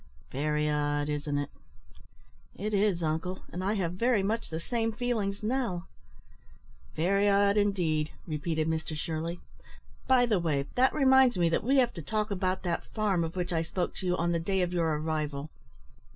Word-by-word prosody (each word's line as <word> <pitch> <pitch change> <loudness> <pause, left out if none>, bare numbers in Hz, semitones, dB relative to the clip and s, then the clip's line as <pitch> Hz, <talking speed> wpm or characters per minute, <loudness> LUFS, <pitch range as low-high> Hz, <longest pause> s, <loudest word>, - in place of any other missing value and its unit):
Very 150 +2 0
odd, 145 0 0
isn't 145 0 -1
it?" 145 0 -3 1.0
"It 210 +2 -3
is, 200 -4 +2
uncle; 160 +4 -2
and 180 - -3
I 200 +3 +1
have 175 -4 -1
very 230 +1 +2
much 225 +3 -1
the 160 - -3
same 225 +5 -1
feelings 215 -4 -2
now." 220 -7 -1 1.1
"Very 195 +5 +2
odd, 200 0 +4
indeed," 175 -7 +1 0.2
repeated 155 0 -1
Mr 160 -1 -2
Shirley. 165 +2 -3 0.7
"By 255 -2 +5
the 215 -5 +2
way, 150 -5 0
that 255 +1 +4
reminds 265 -5 +5
me 170 -1 +3
that 165 - 0
we 270 +5 +3
have 245 -3 +3
to 170 - -6
talk 215 +7 -2
about 185 -1 -1
that 175 -2 -3
farm 205 -6 +1
of 165 +1 -4
which 180 0 -2
I 165 - +2
spoke 175 +2 -2
to 185 - -3
you 180 0 +1
on 170 +1 +1
the 170 - +1
day 190 +2 0
of 175 0 -2
your 170 -2 +1
arrival." 155 -2 -3
180 Hz, 180 wpm, -29 LUFS, 160-210 Hz, 1.1 s, By